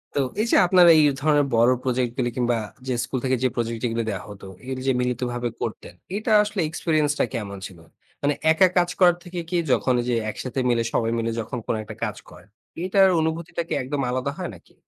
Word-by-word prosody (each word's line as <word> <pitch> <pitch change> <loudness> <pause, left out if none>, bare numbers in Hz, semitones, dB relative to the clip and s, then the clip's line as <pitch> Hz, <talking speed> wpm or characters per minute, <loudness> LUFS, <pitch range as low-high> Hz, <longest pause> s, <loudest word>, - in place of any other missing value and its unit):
তো - - +1 0.2
এই 225 - 0
যে - - +5
আপনারা 175 -1 +6
এই 155 - +6 0.2
ধরনের 150 -1 +3
বড় 115 +2 +5
প্রজেক্ট 125 -2 0
গুলি 125 -2 0
কিংবা 120 -1 +1 0.3
যে 130 - 0
স্কুল 130 +1 -3
থেকে 130 0 +2
যে 130 - +3
প্রজেক্ট 115 0 -3
গুলি 115 0 -1
দেয়া 100 -3 -4
হতো, 100 -1 -10 0.2
এগুলি 130 0 -5
যে 135 - +4
মিলিতভাবে 125 0 -2
করতেন, - - -5 0.2
এটা 220 +2 -2
আসলে 210 -2 -2
এক্সপেরিয়েন্স 155 -2 +1
টা - - +3
কেমন 100 -3 -5
ছিল? 90 -3 -15 0.4
মানে 145 +1 +2 0.2
একা 175 +4 +5
কাজ 175 0 +3
করার 175 -2 +5
থেকে 175 0 -6
কি 180 - 0
যখন 130 0 +2
ওই - - -6
যে 120 - +2 0.2
একসাথে 130 +4 -5
মিলে 120 -1 +2
সবাই 115 0 +1
মিলে 115 0 -1
যখন 115 - -5
কোনো 115 - 0
একটা - - -9
কাজ - - -3
করে, 90 - -15 0.4
এটার 190 +1 +4
অনুভূতিটা 160 +1 -2
কি - - -3
একদম 140 +2 -3
আলাদা 130 +2 -1
হয় 180 - -4
নাকি? 85 - -20
130 Hz, 215 wpm, -23 LUFS, 120-160 Hz, 0.4 s, আপনারা